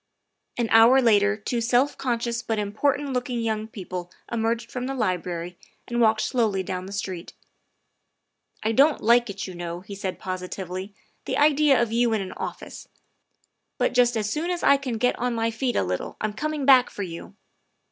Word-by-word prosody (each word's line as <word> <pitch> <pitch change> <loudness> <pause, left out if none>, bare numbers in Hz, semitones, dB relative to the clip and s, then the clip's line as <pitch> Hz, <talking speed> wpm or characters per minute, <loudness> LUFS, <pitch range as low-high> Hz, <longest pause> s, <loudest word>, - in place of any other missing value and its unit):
An 240 -1 0
hour 230 +4 +7
later 210 -4 +3
two 235 +3 -2
self 245 +5 +2
conscious 235 -2 -2
but 225 -2 -2
important 270 +7 0
look 250 0 -2
ing 240 -1 -2
young 220 -1 -2
people 180 -4 -7 0.2
emerged 230 0 -1
from 250 0 -4
the 270 - -3
Library 180 -5 -2 0.3
and 240 0 -1
walked 220 -1 +4
slowly 215 -6 0
down 185 0 -5
the - - -9
street. 190 -3 -5 0.7
" - - -26
I 220 - +1
don't 280 +6 +4
like 235 +1 +4
it, 200 0 -5
you 185 - -7
know," 175 0 -6
he 195 +2 -10
said 195 -1 -4
positively, 185 +1 -5
" - - -43
the - - -2
idea 295 -1 +4
of 235 -2 0
you 235 0 +2
in 215 - 0
an 185 - -7
office! - - -7 0.9
but - - +1
just 245 -1 +3
as 210 -1 -1
soon 310 +10 -2
as 355 -1 -2
I 280 - +6
can 265 -4 -3
get 250 +2 +1
on 245 -1 -1
my 230 0 0
feet 240 +1 -2
a - - +2
little 90 0 -4
I'm 215 -1 -2
coming 300 +4 -3
back 260 -2 +6
for 205 - -5
you." 170 +2 -8
225 Hz, 195 wpm, -25 LUFS, 195-250 Hz, 0.9 s, hour